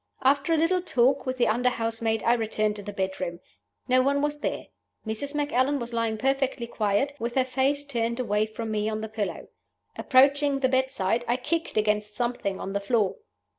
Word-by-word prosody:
"After 280 +4 +3
a 325 - +4
little 345 +3 +2
talk 265 -4 +2
with 255 0 -2
the 240 - +3
under 245 +3 +2
housemaid, 225 -2 -1
I 235 - +4
returned 215 -2 0
to - - -6
the 205 +1 -6
bedroom. 190 -3 -3 0.5
No 255 0 +4
one 280 +2 +1
was 295 0 -1
there. - - -3 0.4
Mrs. 250 +7 -4
Macallan 285 -1 +1
was 240 -2 -6
lying 230 -1 0
perfectly 270 0 0
quiet, 225 +4 0
with 235 +1 -3
her 260 -1 +3
face 275 +2 0
turned 235 -3 -2
away 215 -3 +1
from 220 +1 -5
me 210 0 0
on 215 0 -3
the 220 - -4
pillow. 215 -2 -4 0.5
Approaching 280 +1 +4
the 260 - +3
bedside, 260 -4 +1
I 240 - +1
kicked 330 +2 -2
against 210 0 0
something 240 -5 -2
on 195 - -5
the 200 - 0
floor. 205 -1 0
240 Hz, 190 wpm, -26 LUFS, 215-270 Hz, 0.5 s, a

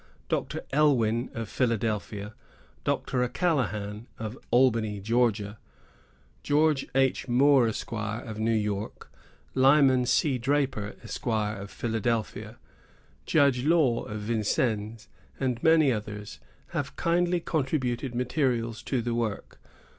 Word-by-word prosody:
Dr. - - -2
Elwyn, 125 -5 +2
of 115 -1 -4
Philadelphia, 110 -3 -2 0.5
Dr. 125 - -1
O'Callaghan, 115 - -1
of 110 +1 -5
Albany, 115 -5 +2
George 115 0 +1 1.5
H. 135 0 +2
Moore, 130 0 +5
Esq., 110 - -4
of 110 0 -4
New 110 +1 +1
York, 105 -1 -3 0.4
Lyman 130 -2 +5
C. 130 0 +2
Draper, 135 -5 -1
Esq., - - -7
of 105 -3 -1
Philadelphia, 110 -1 -2 0.7
Judge 140 -5 +3
Law, 150 -6 +3
of 105 0 -6
Vincennes, 110 0 -1 0.3
and 125 -3 -1
many 160 -4 +5
others, 105 -2 -5 0.3
have - - -4
kindly 175 +1 +1
contributed 135 -5 -1
materials 125 -2 0
to 125 -4 -2
the 120 0 -1
work. 115 -3 -3
120 Hz, 105 wpm, -27 LUFS, 110-135 Hz, 1.5 s, Moore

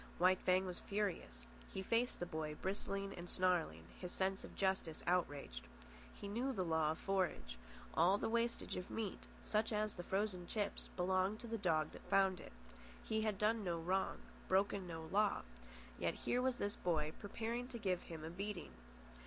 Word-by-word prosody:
White 185 +1 +5
Fang 185 +1 +4
was 180 -1 -4
furious. 200 - -2 0.3
He 190 - -3
faced 235 +4 +2
the 175 - -1
boy, 155 -2 -3
bristling 195 +2 -2
and 175 0 -7
snarling, 180 -3 +2 0.2
his 180 -1 -4
sense 190 +1 0
of - - -9
justice 190 -5 0
outraged. 145 - 0 0.5
He - - -6
knew 240 +7 0
the 190 -8 0
law 160 -2 +3
of - - -10
forage. 180 - 0 0.3
All 180 +5 +5
the - - 0
wastage 235 +1 +1
of 180 - -5
meat, 220 -4 -3 0.2
such 215 +1 +1
as 215 0 +1
the 175 - -6
frozen 190 -2 0
chips, 210 -2 -2
belonged 185 +3 +2
to 240 - -6
the 230 - -1
dog 160 -5 +2
that - - -12
found 190 -2 +4
it. - - -10 0.5
He 220 0 0
had 215 -2 +1
done 215 +2 +2
no 175 -3 0
wrong, 185 +4 +1 0.3
broken 195 0 +2
no 165 -1 -5
law, 205 +1 +3 0.6
yet - - +1
here 250 - +1
was 260 -1 +2
this 205 -3 -1
boy 155 -3 +1
preparing 230 +4 -2
to 250 -2 -5
give 185 -5 0
him 160 -2 -7
a 160 - -4
beating. 200 +1 -4
190 Hz, 180 wpm, -40 LUFS, 175-210 Hz, 0.6 s, White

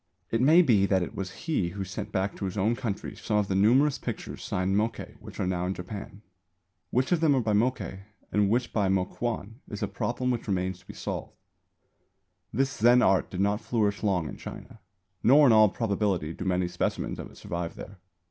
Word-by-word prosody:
It 115 - +1
may 160 +7 +7
be 105 - +4
that 95 -2 +2
it - - -6
was 95 -2 -4
he 145 - 0
who 95 +2 -5
sent 100 +2 -6
back 100 0 -1
to 100 - -3
his 95 +2 -4
own 110 +5 +2
country 115 -5 -4
some 105 - -1
of 105 -1 +1
the 95 - -1
numerous 125 +9 +4
pictures - - -6
signed 95 +1 0
Mokkei 110 +3 -1
which - - -11
are - - 0
now 90 -1 -1
in 95 - -2
Japan. 100 +2 -8 0.7
Which 130 +2 0
of 175 - +3
them 155 -3 +4
are - - +3
by 110 -2 0
Mokkei 110 -3 0 0.3
and 105 -1 +2
which 120 +3 0
by 105 -3 +2
Mokuan 105 +3 -2
is 105 - -5
a - - +1
problem 125 +1 -2
which 120 -2 -3
remains 95 -2 -1
to - - -24
be - - -9
solved. - - -5 1.2
This 135 0 +1
Zen 120 +3 +5
art 95 -1 +3
did 95 - -3
not 100 +2 +1
flourish 105 -4 0
long 95 -7 +1
in - - -7
China, 115 -2 -10 0.4
nor 145 +5 +6
in 125 - +6
all 110 -1 +7
probability 100 -7 -1
do 90 - -6
many 90 -1 +1
specimens 90 0 -2
of - - -6
it - - -17
survive 85 -1 -4
there. 100 -1 -10
105 Hz, 210 wpm, -28 LUFS, 95-120 Hz, 1.2 s, may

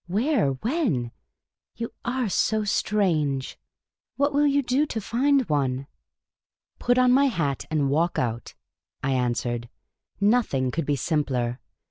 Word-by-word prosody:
" - - -45
Where? 245 - +2
When? 195 - -1 0.6
You 230 +1 -5
are 250 -1 -1
so 215 +2 +1
strange! 160 - 0 0.6
What 285 +3 +1
will 290 +1 +3
you 285 0 +2
do 260 +5 +1
to 225 - -3
find 260 +5 +1
one? 135 -3 0 0.3
" - - -67
" - - -53
Put 245 0 +2
on 255 0 +5
my 275 +3 +5
hat 150 - -1
and 150 -3 +1
walk 160 +5 +1
out," 115 -1 -3 0.5
I 135 - 0
answered. 120 -2 -1 0.3
" - - -65
Nothing 200 - +2
could 160 +2 -3
be 145 - +2
simpler. 130 -4 -1
170 Hz, 150 wpm, -25 LUFS, -, 0.6 s, on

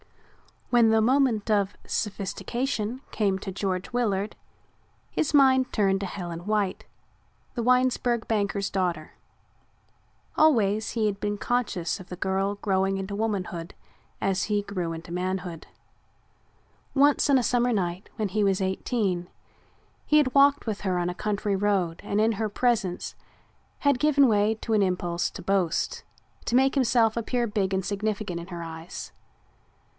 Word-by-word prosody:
When 235 -2 +5
the 220 0 +4
moment 235 -3 +2
of 200 -1 +1
sophistication 230 +4 -2
came 200 -3 +1
to 195 - -5
George 190 +3 -3
Willard 210 -4 0 0.8
his 310 - -1
mind 260 -2 +5
turned 195 -2 +2
to 195 - -3
Helen 175 -1 -6
White, 210 -3 0 0.7
the 240 - -1
Winesburg 250 -1 +2
banker's 200 -2 0
daughter. 175 -5 -1 1.3
Always 220 -9 +3
he 225 -2 0
had 200 -1 -1
been 205 0 -2
conscious 205 -7 -1
of 185 - -11
the 180 - -6
girl 195 +2 -1
growing 195 -1 0
into 195 +1 -4
womanhood 190 -5 -3 0.5
as 195 -1 +1
he 205 -1 0
grew 180 -5 -3
into 165 +1 -8
manhood. 180 -2 -3 1.3
Once 285 +1 +4
on 275 - +6
a 250 - +1
summer 245 0 +2
night 180 -2 -2
when 215 -2 -2
he 210 +2 0
was 195 -1 +2
eighteen, 190 -2 -1 0.8
he 300 - +4
had 265 -4 +3
walked 280 0 +5
with 215 -3 -3
her 185 -3 0
on 175 0 0
a - - -3
country 205 +1 -1
road 190 -4 0
and 205 - -1
in 225 +1 +3
her 215 +1 -2
presence 205 -5 0 0.7
had 285 -3 +2
given 285 -2 +5
way 215 0 +3
to 225 - -2
an 215 - +4
impulse 180 -2 0
to - - -9
boast, 185 -3 0 0.4
to 240 - 0
make 265 +1 +4
himself 235 -4 +3
appear 240 +1 0
big 205 -3 -1
and 190 -1 0
significant 205 -3 -2
in 170 - -8
her 175 -2 -6
eyes. 165 +1 -8
205 Hz, 150 wpm, -26 LUFS, 190-235 Hz, 1.3 s, on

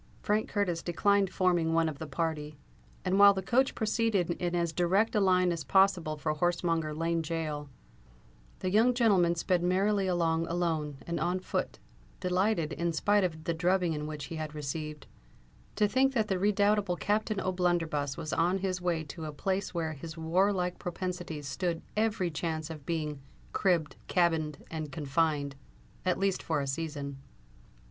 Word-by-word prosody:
Frank 215 -1 +1
Curtis 180 -5 0
declined 200 +2 +2
forming 175 -3 +1
one 165 -1 +3
of 150 -3 -5
the 160 - -5
party; 150 0 -3 0.5
and 190 +2 +2
while 200 0 +8
the 190 - -3
coach 255 +7 +2
proceeded 215 -5 +1
in 175 0 -2
as 170 -2 0
direct 190 +6 +2
a 210 - +3
line 185 -2 +3
as 170 -2 -3
possible 190 -5 +3
for 155 +1 -1
Horsemonger 165 -1 0
Lane 165 +1 0
gaol, 155 -3 -3 0.9
the 185 - -1
young 230 +5 +4
gentleman 195 -8 +4
sped 175 +1 +1
merrily 195 +2 +2
along 165 -2 +1
alone 160 -4 -1
and 170 0 -2
on 180 +2 0
foot, - - -3 0.4
delighted, 180 -3 +1
in 170 +4 -1
spite 205 +5 +3
of 160 -3 -2
the 170 - -1
drubbing 170 -3 +1
which 150 -2 -5
he 160 +3 -6
had 155 -1 -5
received, 150 +1 -5 0.7
to 210 - +3
think 265 +4 +2
that 220 -4 +1
the 190 -2 0
redoubtable 205 -1 +2
Captain 205 +5 0
O'Blunderbuss 175 -6 0
was 155 - -4
on 175 +3 +2
his 185 -1 -2
way 170 -3 0
to 160 +1 -7
a 155 - -4
place 190 +6 -2
where 165 -3 -2
his 160 +2 -8
warlike 180 +2 +1
propensities 175 -4 -4
stood 170 +2 -2 0.2
every 210 -5 +1
chance 160 0 -3
of 150 -3 -10
being 150 -4 -2 0.3
"cribb'd, 170 -6 +1
cabin'd, 160 -4 +1
and 155 -3 -4
confin'd," 150 -1 0 0.5
at 185 -1 +1
least 195 -1 0
for 160 -3 -1
a 140 - -1
season. 140 -1 -4
170 Hz, 165 wpm, -30 LUFS, 155-190 Hz, 0.9 s, while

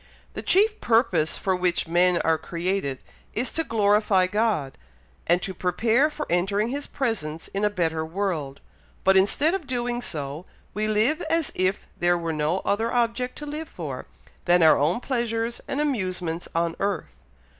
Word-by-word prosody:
The - - -5
chief 425 +3 +3
purpose 205 -9 +2
for 190 -1 0
which 180 -2 0
men 175 +1 +3
are 160 -1 +2
created, 170 -5 -2 0.4
is 245 +4 0
to 325 - +1
glorify 210 -5 +3
God, 205 -8 0 0.5
and 175 +2 +3
to 190 - -3
prepare 225 - +2
for 300 0 -5
entering 200 +5 +1
his 285 +3 -4
presence 165 - -3
in 200 +1 -3
a 210 - +4
better 165 -5 -1
world; 160 -5 -3 0.4
but 190 0 +5
instead 245 - +3
of 370 -7 -3
doing 245 -1 -1
so, 150 - -5 0.3
we 215 +1 -1
live 220 +10 +2
as 330 -2 +1
if 185 +1 0
there 175 0 +3
were 165 -1 -3
no 155 +4 0
other 225 +3 0
object 245 +1 0
to 295 - -7
live 305 +2 -5
for, - - -6 0.4
than 175 -1 +5
our 160 - +6
own 160 - +1
pleasures 235 -2 -2
and 275 - -2
amusements 185 - -2
on 170 0 0
earth. 200 -4 -1
195 Hz, 165 wpm, -25 LUFS, 170-240 Hz, 0.5 s, our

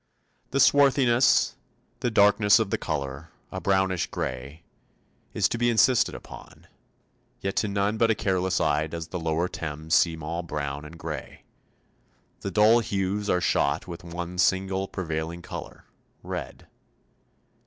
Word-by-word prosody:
The 140 - -1
swarthiness, 135 -4 +4 0.5
the 120 - 0
darkness 105 -1 +5
of 110 -4 -1
the - - +1
colour 70 0 -4 0.2
a - - -5
brownish 95 -2 +1
grey 70 +6 -5 0.7
is - - +3
to 115 - -3
be 120 0 +3
insisted 120 +2 +3
upon; - - -12 0.7
yet 95 0 -3
to 105 - +2
none 100 +2 0
but 115 0 +3
a 110 - +3
careless 95 -2 0
eye 75 +1 +1
does 80 +1 -6
the 90 - -4
lower 80 +1 0
Thames 80 -1 -5
seem 80 -2 +3
all 85 +3 -3
brown 75 -3 -4
and 80 +2 -11
grey. - - -7 1.0
The - - -4
dull 110 +3 +5
hues 100 -1 -2
are 90 - +2
shot 70 -3 +1
with 85 -1 -8
one 85 +1 -6
single 95 +2 +1
prevailing 85 -2 -4
colour - - -8 0.4
red. - - -6
90 Hz, 145 wpm, -26 LUFS, 80-105 Hz, 1.0 s, darkness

